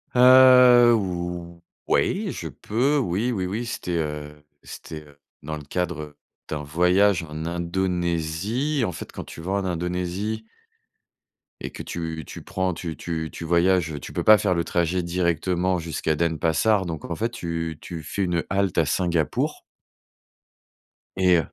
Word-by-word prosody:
Heu, 125 -1 +8
ou 85 -3 -4 0.3
ouais, - - +1
je - - -6
peux. 130 +7 0
Oui, 115 -1 0
oui, 95 -4 -2
oui, 105 +6 -3
c'était, 105 -6 -4
heu, 75 -1 -5 0.2
c'était, 75 -1 -9
heu, 70 -1 -20 0.2
dans 75 +1 -4
le 75 - -9
cadre 75 -2 -4 0.3
d'un 75 -1 -4
voyage 90 +5 +3
en 80 +1 -5
Indonésie. 85 - -1
Et 115 - +2
en - - -2
fait, - - -8
quand - - -7
tu - - -10
vas 95 +4 -3
en 100 -1 0
Indonésie 90 +5 -3 1.1
et - - -5
que - - -8
tu 80 -2 -5
tu - - -9
prends 95 -1 -1
tu 85 -1 -5
tu 80 -2 -4
tu - - -8
voyages, 85 -2 +2
tu - - -9
peux - - -2
pas 110 0 +8
faire 95 -2 +1
le 85 -1 0
trajet 85 +2 0
directement 90 +1 0
jusqu'à 80 -1 -2
Denpasar. 85 +5 +1
Donc 80 -3 -5
en 85 - -2
fait, 115 +7 -1
tu 85 -5 -4
tu 85 -3 -7
fais 100 +6 -2
une 85 -2 0
halte 95 -1 0
à 85 - +4
Singapour 85 0 0 1.5
et, 90 -2 +4
85 Hz, 155 wpm, -24 LUFS, 80-95 Hz, 1.5 s, Heu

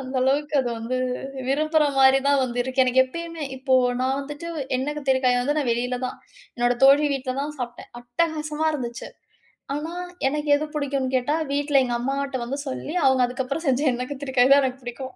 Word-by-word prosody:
அந்த 260 0 -5
அளவுக்கு 290 +3 +1
அது 245 - -2
வந்து 240 +3 -3 0.5
விரும்புற 310 +2 +2
மாரி 265 0 +6
தான் 280 -1 +4
வந்து 245 -1 -4
இருக்கு. 260 +1 +1
எனக்கு 255 +1 +3
எப்பயுமே 335 +3 -7
இப்போ 260 0 +1 0.3
நான் 265 +2 0
வந்துட்டு 295 +4 -7 0.3
எண்ணெய் 290 +3 -3
கத்திரிக்காயை 260 -3 +2
வந்து 290 +4 0
நான் 270 -5 0
வெளில 245 +1 -2
தான், - - -7 0.4
என்னோட 240 0 +2
தோழி 285 +2 +6
வீட்ல 255 -1 -3
தான் 300 +1 -4
சாப்பிட்டேன், 245 -1 -7
அட்டகாசமா 305 +4 -2
இருந்துச்சு. 240 -4 -5 0.7
ஆனா, 310 +3 -4 0.4
எனக்கு 295 +1 -2
எது 305 +1 -1
புடிக்கும்னு 275 -3 -1
கேட்டா, 255 +4 -1 0.2
வீட்ல 285 -1 +2
எங்க 240 -1 -2
அம்மாட்ட 275 +1 -2
வந்து 275 +4 -4
சொல்லி 280 +4 -5
அவங்க 265 -1 +4
அதுக்கப்புறம் 260 +6 -4
செஞ்ச 265 +1 +2
எண்ணெய் 250 +2 -4
கத்திரிக்காய் 265 -2 +1
தான் 280 0 +5
எனக்கு 260 0 -3
புடிக்கும். 255 +2 -7
270 Hz, 180 wpm, -24 LUFS, 255-295 Hz, 0.7 s, மாரி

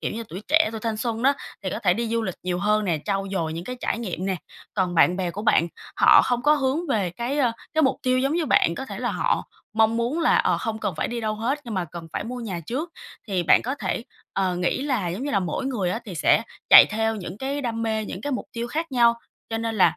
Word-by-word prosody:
kiểu - - -2
như, 230 +1 -4
tuổi 185 +6 -7
trẻ, 320 -4 +4
tuổi 220 -1 -6
thanh 225 -1 -2
xuân 230 0 -2
đó, 275 - +5 0.3
thì 185 - -2
có - - -3
thể 180 -3 +2
đi 230 +2 -2
du 230 0 0
lịch 185 -5 -3
nhiều 180 -1 -1
hơn 210 +1 +2
nè, 165 -5 0
trau 195 -1 -1
dồi 165 -4 -1
những 170 +2 -5
cái 250 - -5
trải - - -1
nghiệm 190 -4 -4
nè. 190 -1 0 0.4
Còn 185 -3 0
bạn 175 +2 +5
bè 180 -2 -1
của 205 +4 -6
bạn 170 -6 +3 0.3
họ - - +7
không 245 -1 0
có 300 +1 +5
hướng 285 +4 0
về 200 -9 +1
cái, 240 - -3
ơ, 245 -5 +3 0.2
cái 315 - +3
mục 265 -2 +3
tiêu 255 0 +2
giống 275 +2 +1
như 335 -3 0
bạn, 170 -8 +3
có 265 - -5
thể - - -7
là - - -1
họ - - 0 0.3
mong 225 +1 +3
muốn 245 +8 0
là, - - +4
ờ, - - +2
không 220 -1 -3
cần 190 - -2
phải - - -1
đi 240 0 -3
đâu 215 -1 -1
hết 245 +7 -1
nhưng 230 -3 -5
mà 185 -2 0
cần 165 0 -9
phải - - -3
mua 250 +2 -5
nhà 190 -7 -4
trước. 300 +8 -3 0.4
Thì 185 -3 0
bạn - - +5
có 260 +4 -2
thể, 240 -4 -3 0.3
ờ, 185 -2 0
nghĩ 180 +8 0
là 250 -11 0
giống 190 +9 -4
như 290 - -2
là 200 - +2
mỗi 180 +10 -2
người 205 -9 -1
á, 225 - -1
thì 190 -5 -7
sẽ 195 - +3 0.3
chạy - - +11
theo 220 +1 0
những 185 0 -7
cái 275 +3 -2
đam 230 -3 -3
mê, 220 -1 -1
những 185 - -6
cái 290 +5 -3
mục 255 - -3
tiêu 235 0 -3
khác 320 +1 -3
nhau 235 -1 +5 0.4
cho 225 - -1
nên 225 0 -2
là, 190 - +4
225 Hz, 280 wpm, -24 LUFS, 185-255 Hz, 0.4 s, chạy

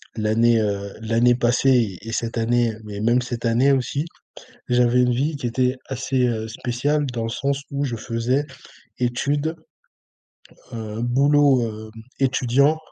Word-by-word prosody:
l'année, 115 +1 +3
heu, 100 -1 -2
l'année 115 +2 +3
passée 120 -4 +2
et 115 - -7
cette 115 0 -3
année 120 0 +1
mais 105 -1 -7
même 120 +3 +3
cette 120 -1 -5
année 120 +5 +3
aussi, 135 +3 0 0.6
j'avais 125 0 +3
une 125 - +2
vie 145 +5 0
qui 135 - -6
était 125 +2 0
assez, 130 -1 0
heu, 110 -2 -2
spéciale 125 +6 -1
dans 115 -1 -2
le 115 - -2
sens 140 +4 -2
où 140 0 -1
je 120 -4 -3
faisais 120 +5 -1 0.5
études, 145 +6 -1 1.2
heu, 110 -1 -5
boulot, 140 +2 +3
heu, 110 -1 -6 0.3
étudiant 135 +3 +2
120 Hz, 145 wpm, -22 LUFS, 115-135 Hz, 1.2 s, l'année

